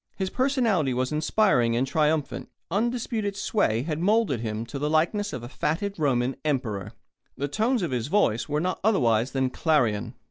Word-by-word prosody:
His 190 Hz, -1 st, -3 dB
personality 230 Hz, -, +1 dB
was 130 Hz, +2 st, -1 dB
inspiring 150 Hz, -, +2 dB
and 125 Hz, +3 st, +1 dB
triumphant. 150 Hz, 0 st, 0 dB, 0.2 s
Undisputed 220 Hz, -1 st, -1 dB
sway 120 Hz, -, +1 dB
had 155 Hz, 0 st, -3 dB
moulded 200 Hz, -, +2 dB
him 110 Hz, 0 st, -3 dB
to 140 Hz, -, -6 dB
the 150 Hz, +1 st, -1 dB
likeness 190 Hz, +7 st, +1 dB
of 120 Hz, -, -6 dB
a -, -, -6 dB
fatted 170 Hz, +8 st, -2 dB
Roman 130 Hz, -3 st, +1 dB
emperor. 125 Hz, -10 st, -2 dB, 0.4 s
The 140 Hz, -, -1 dB
tones 220 Hz, -, 0 dB
of 170 Hz, -, -2 dB
his 120 Hz, -2 st, -1 dB
voice 150 Hz, -, +1 dB
were 150 Hz, +1 st, 0 dB
not 180 Hz, +3 st, -1 dB
otherwise 125 Hz, -, +2 dB
than 130 Hz, -1 st, 0 dB
clarion. 120 Hz, -8 st, +1 dB
150 Hz, 170 wpm, -26 LUFS, 125-200 Hz, 0.4 s, inspiring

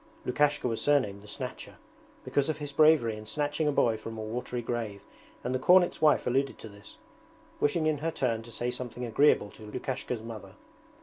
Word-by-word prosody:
Lukashka 145 Hz, +1 st, +2 dB
was 115 Hz, -2 st, -2 dB
surnamed 130 Hz, -9 st, +2 dB
'the 105 Hz, -, -15 dB
Snatcher' 125 Hz, +4 st, -6 dB, 0.5 s
because 140 Hz, +1 st, 0 dB
of 155 Hz, -, -1 dB
his 145 Hz, -2 st, -5 dB
bravery 150 Hz, -7 st, +4 dB
in 110 Hz, 0 st, -10 dB
snatching 145 Hz, +6 st, 0 dB
a -, -, +3 dB
boy 115 Hz, -5 st, +2 dB
from 115 Hz, +1 st, -8 dB
a -, -, -4 dB
watery 120 Hz, +2 st, -4 dB
grave, 115 Hz, -4 st, -4 dB, 0.4 s
and 125 Hz, -, -2 dB
the 130 Hz, -, 0 dB
cornet's 180 Hz, +5 st, +4 dB
wife 150 Hz, -2 st, +4 dB
alluded 135 Hz, +2 st, 0 dB
to -, -, -9 dB
this, 100 Hz, -1 st, -13 dB, 0.6 s
wishing 155 Hz, +2 st, +1 dB
in 155 Hz, -2 st, +1 dB
her 160 Hz, +3 st, -1 dB
turn 120 Hz, -8 st, -1 dB
to 115 Hz, +1 st, -12 dB
say 120 Hz, +2 st, -2 dB
something 125 Hz, 0 st, -5 dB
agreeable 115 Hz, -3 st, +3 dB
to 105 Hz, -1 st, -12 dB
Lukashka's 125 Hz, -1 st, -4 dB
mother. 115 Hz, -2 st, -9 dB
125 Hz, 190 wpm, -29 LUFS, 110-145 Hz, 0.6 s, bravery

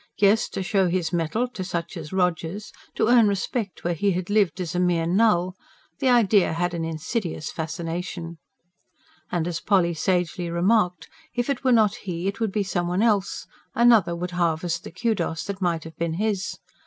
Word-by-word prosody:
Yes, 205 Hz, +2 st, +3 dB
to 190 Hz, -, -4 dB
show 190 Hz, 0 st, +2 dB
his 170 Hz, -2 st, -1 dB
mettle 175 Hz, +9 st, 0 dB
to 205 Hz, -6 st, -6 dB
such 170 Hz, -2 st, -4 dB
as 155 Hz, -3 st, -7 dB
Rogers; 180 Hz, +1 st, -1 dB, 0.2 s
to -, -, +2 dB
earn 240 Hz, -2 st, +6 dB
respect 200 Hz, +1 st, -2 dB
where 175 Hz, -, 0 dB
he 195 Hz, +4 st, +1 dB
had 180 Hz, +2 st, -3 dB
lived 195 Hz, -5 st, +2 dB
as 180 Hz, -1 st, -3 dB
a 180 Hz, -, 0 dB
mere 175 Hz, -2 st, +2 dB
null 185 Hz, -1 st, +2 dB, 0.5 s
the 260 Hz, -, +2 dB
idea 215 Hz, -7 st, +4 dB
had 175 Hz, +2 st, -1 dB
an 170 Hz, -1 st, -2 dB
insidious 165 Hz, +1 st, -3 dB
fascination. 165 Hz, +1 st, -5 dB, 0.9 s
And 170 Hz, -2 st, 0 dB
as 170 Hz, -2 st, -2 dB
Polly 180 Hz, -3 st, +2 dB
sagely 175 Hz, +1 st, -1 dB
remarked: 180 Hz, -1 st, +1 dB, 0.3 s
if 245 Hz, +3 st, 0 dB
it 250 Hz, -, -3 dB
were 260 Hz, -, +3 dB
not 215 Hz, -4 st, +4 dB
he, 180 Hz, -7 st, -5 dB
it 200 Hz, -, -3 dB
would 225 Hz, -3 st, 0 dB
be 210 Hz, 0 st, 0 dB
some 175 Hz, -2 st, -1 dB
one 180 Hz, +4 st, +1 dB
else; 205 Hz, -4 st, +1 dB, 0.3 s
another 230 Hz, -8 st, +5 dB
would 180 Hz, +1 st, -4 dB
harvest 170 Hz, -1 st, -1 dB
the -, -, -8 dB
KUDOS 175 Hz, -4 st, -1 dB
that 200 Hz, -1 st, -6 dB
might 170 Hz, -3 st, 0 dB
have 160 Hz, 0 st, -11 dB
been 170 Hz, -1 st, -1 dB
his. 200 Hz, 0 st, -1 dB
180 Hz, 185 wpm, -24 LUFS, 170-205 Hz, 0.9 s, earn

